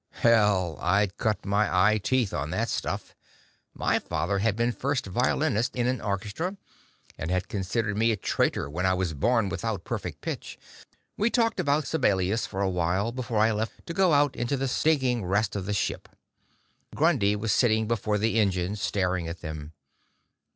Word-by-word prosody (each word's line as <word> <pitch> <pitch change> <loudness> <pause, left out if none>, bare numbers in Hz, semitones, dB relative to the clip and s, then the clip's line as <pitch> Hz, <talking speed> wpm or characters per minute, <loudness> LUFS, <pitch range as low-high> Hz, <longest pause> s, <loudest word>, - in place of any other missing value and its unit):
Hell, 105 -8 +3
I'd 100 -1 +2
cut 110 -3 -1
my 100 0 +2
eye 105 +4 +4
teeth 125 0 0
on - - -2
that - - -1
stuff; - - -3 0.6
my - - +1
father 85 +6 -1
had 105 0 +1
been 120 +2 +1
first 135 +2 -2
violinist 125 +4 0
in 120 -1 0
an 125 0 0
orchestra, 105 - -3 0.6
and 80 - -3
had 90 +1 0
considered 100 +2 -2
me 115 +2 +3
a 110 - -1
traitor 85 - 0
when 80 +6 -4
I 95 - +3
was 90 -3 -1
born 115 - +2
without 105 0 -3
perfect - - -5
pitch. - - -5 0.6
We 215 +3 +2
talked 230 -4 +1
about 150 -3 +1
Sibelius 105 - +1
for 95 - -4
awhile, 95 +3 0
before 120 -2 -3
I 110 +2 +4
left 110 0 -4
to 170 - -5
go 185 -1 +3
out 145 -2 +3
into 120 +4 -1
the 135 +1 -1
stinking 130 -4 +1
rest 100 +4 0
of 95 -2 -3
the - - -1
ship. 100 - -2 0.9
Grundy 135 -11 +3
was 105 +1 -1
sitting 110 -3 +3
before 105 -2 0
the 110 +2 +1
engines, 95 -1 0
staring 90 -3 0
at 85 +1 -6
them. 80 -1 -6
105 Hz, 170 wpm, -27 LUFS, 95-125 Hz, 0.9 s, eye